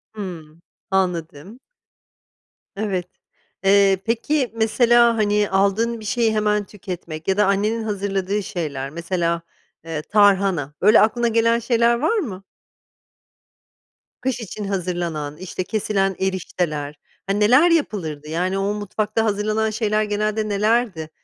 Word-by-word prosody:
Hımm, 170 -6 -8 0.3
anladım. 180 - -2 1.2
Evet. 195 -4 -2 0.6
Eee, 195 0 +5
peki, 245 +4 0
mesela, 235 +1 +4
hani, 210 -1 +2
aldığın 200 +5 +1
bir 215 - -10
şeyi 225 0 +1
hemen 210 -1 +1
tüketmek 180 -5 -8
ya 190 0 +1
da 210 - +4
annenin 210 +3 0
hazırladığı 200 -1 -2
şeyler, 145 -7 -4
mesela, 170 +1 -2 0.4
eee, 160 -2 -4
tarhana. 195 -6 +2
Böyle 210 +4 +6
aklına 235 +2 +2
gelen 230 0 +2
şeyler 235 0 +2
var 315 - +1
mı? 195 - -5 1.8
Kış 255 0 -1
için 215 -1 -7
hazırlanan, 175 -6 -3
işte, 185 +1 -5
kesilen 195 -1 -1
erişteler, 165 -6 -2 0.3
hani, 200 +1 0
neler 255 +11 +5
yapılırdı? 165 - -1
Yani, 180 +4 -1
o 195 +1 0
mutfakta 215 +2 -2
hazırlanan 215 +1 0
şeyler 215 -1 0
genelde 215 +1 -1
nelerdi? 210 -5 0
205 Hz, 120 wpm, -21 LUFS, 180-220 Hz, 1.8 s, Böyle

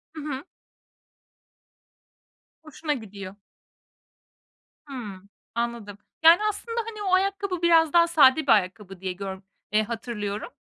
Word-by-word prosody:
Hı 310 - -6
hı. 285 -2 -5 2.2
Hoşuna 310 0 -3
gidiyor. 200 -5 -8 1.5
Hımm, 205 -8 -8 0.3
anladım. 235 -4 -3 0.3
Yani, 330 +2 +8
aslında, 460 +3 -4
hani, 430 -2 -7
o 375 -2 0
ayakkabı 390 -1 0
biraz 330 -2 +4
daha 340 0 +6
sade 310 -3 +5
bir - - +5
ayakkabı 195 -1 0
diye 185 -1 -3
gör 190 0 -6 0.3
eee, 215 +1 +3
hatırlıyorum. 215 -2 -5
250 Hz, 115 wpm, -25 LUFS, 205-335 Hz, 2.2 s, Yani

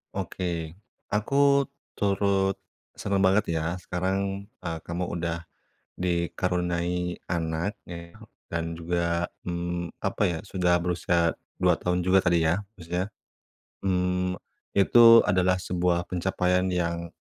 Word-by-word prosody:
Oke. 85 -3 -3 0.4
Aku 105 +6 0 0.6
turut 100 -1 +1 0.4
senang 100 -1 0
banget 95 +2 +4
ya 80 +3 -1
sekarang, 95 +2 -2 0.2
eee, 85 -1 -2
kamu 85 +2 -2
udah 85 -1 -3 0.5
dikaruniai 90 0 -1
anak 85 +2 -1 0.2
ya, 85 0 -8 0.3
dan 85 0 -3
juga, 85 0 0 0.2
mmm, 85 0 -3
apa - - -2
ya, 80 - -2
sudah 90 -2 +2
berusia 85 -1 +1 0.2
2 - - +4
tahun 90 0 -1
juga 95 +1 +5
tadi 85 -2 +3
ya. 90 +6 +1 0.2
Maksudnya, 90 +4 -3 0.8
mmm, 90 0 +1 0.4
itu 115 +3 +8
adalah 90 -1 +3
sebuah 90 -1 +1
pencapaian 90 0 +1
yang 85 -1 -1
90 Hz, 110 wpm, -27 LUFS, 85-95 Hz, 0.8 s, itu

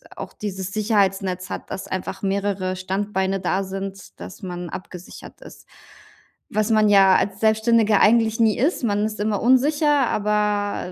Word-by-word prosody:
auch - - -7
dieses 190 -2 -6
Sicherheitsnetz 195 -3 0
hat, - - -7
dass 190 - -6
einfach 190 +1 -5
mehrere 195 -1 -2
Standbeine 190 0 -2
da 190 +1 0
sind, 195 0 -7
dass 190 - -10
man 180 -2 -6
abgesichert 180 +1 -10
ist, - - -14 0.8
was 215 0 -1
man 215 -1 +4
ja 195 -2 +6
als 200 0 -2
Selbstständiger 220 -1 +3
eigentlich 225 0 +3
nie 220 -2 +3
ist, 285 +3 0
man 205 -1 0
ist 215 -1 -5
immer 210 -1 -1
unsicher, 285 +2 +3
aber, 210 -2 -1
205 Hz, 150 wpm, -22 LUFS, 190-220 Hz, 0.8 s, ja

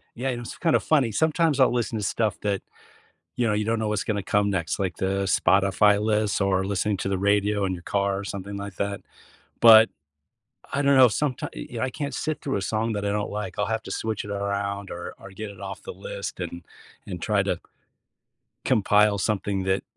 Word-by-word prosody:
Yeah. 130 +3 -2
It 120 -2 -2
was 120 - -7
kinda 165 -3 +3
funny. 135 -8 +2
Sometimes 160 - +2
I'll 130 - +5
listen 115 -2 -1
to 105 - -3
stuff 105 +1 0
that, 100 -2 -1 0.8
you 120 -1 +1
know, 105 - +2
you 105 0 0
don't 115 +1 0
know 110 -1 -1
what's 105 -1 -1
gonna 105 -2 -1
come 105 +1 +1
next, 85 -5 -1
like 95 -3 -2
the 95 +1 0
Spotify 100 +2 +3
list 105 -1 +1
or 95 -1 +2
listening 100 +1 0
to - - -2
the 95 -1 0
radio 100 +1 +2
in 95 - 0
your 85 - -9
car 100 +1 0
or 100 - -5
something 100 +1 -6
like 100 -1 -7
that, 100 0 -2 0.6
but 110 -1 +9 0.8
I 140 - 0
don't 140 -1 +4
know, 130 - +9
someti 130 +3 -1
y - - -7 0.2
you 120 - -6
know, 110 - -1
I 130 - 0
can't 145 0 -4
sit 155 0 -3
through 135 - -2
a 100 - -3
song 110 +4 -1
that 105 -1 -3
I 100 - +1
don't 105 0 -1
like, 105 -2 -5
I'll 105 - +1
have 110 0 -2
to - - -7
switch 110 -2 -2
it 105 - -6
around 100 0 -2
or, 85 0 -6
or 95 - -11
get 105 +2 -7
it 100 - -15
off 95 -1 -7
the - - -7
list 100 +1 -6
and 85 -1 -5 0.4
and - - -6
try - - +1
to - - -1 1.1
compile 105 0 +3
something 100 -1 -1
that, 95 +1 +1
105 Hz, 220 wpm, -25 LUFS, 100-110 Hz, 1.1 s, but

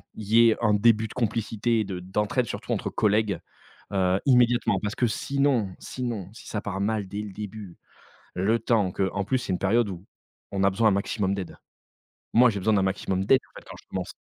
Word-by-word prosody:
il 110 - -7
y 115 +1 +6
ait 110 - +1
un 105 -3 +3
début 110 +1 +3
de - - -10
complicité 115 -1 0
de 95 -3 -5
d'entraide 105 +7 -1
surtout - - -6
entre - - -1
collègues, 105 -3 +1 0.5
heu, 95 -1 +2
immédiatement. 120 -6 +3
Parce 105 0 -3
que 125 - +1
sinon, 135 -2 0
sinon 115 -7 -5
si 115 - -13
ça 105 - -3
part 100 -2 -4
mal 105 -1 -1
dès 100 +2 -4
le 105 -2 -7
début 105 -2 -8 0.6
le 105 +6 +2
temps 110 -4 +1
que 95 +1 0
en 100 - -1
plus, 130 +7 0
c'est 120 -6 -3
une 90 - -2
période 115 +4 +2
où 90 0 -8 0.5
on 100 -1 -2
a 100 - +5
besoin 110 +3 +3
un - - +2
maximum 100 0 0
d'aide. 95 -3 -6 0.8
Moi 125 +1 +6
j'ai 100 - -3
besoin 110 +3 +2
d'un 95 - +2
maximum 95 0 -1
d'aide 130 +5 +5
en - - -33
fait - - -22
quand - - -8
je - - -32
commence. - - -4
105 Hz, 215 wpm, -26 LUFS, 95-115 Hz, 0.8 s, y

